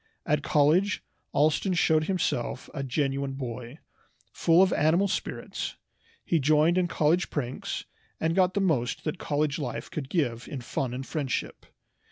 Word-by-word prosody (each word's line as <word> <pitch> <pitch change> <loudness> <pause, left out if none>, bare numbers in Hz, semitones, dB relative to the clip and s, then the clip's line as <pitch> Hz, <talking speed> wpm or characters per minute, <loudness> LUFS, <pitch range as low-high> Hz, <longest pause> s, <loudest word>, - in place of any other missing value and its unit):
At 150 0 +1
college 160 +7 +3 0.3
Allston 155 +5 +2
showed 155 -2 +3
himself 155 -9 -1
a 140 - -3
genuine 135 0 -1
boy, 125 0 -6 0.5
full 170 +3 +4
of 190 - +2
animal 170 +6 +3
spirits. - - -4 0.5
He 165 - +2
joined 155 +4 +4
in 180 -1 +2
college 165 +2 +2
pranks, 130 -4 -3 0.3
and 160 +1 +1
got 185 0 +3
the 200 - +2
most 140 -11 0
that 160 +3 -3
college 145 0 0
life 145 - -4
could 135 -4 -4
give 125 -9 -1
in 140 -4 -5
fun 125 +1 -3
and 130 +1 -5
friendship. 140 -5 -3
150 Hz, 150 wpm, -27 LUFS, 135-170 Hz, 0.5 s, full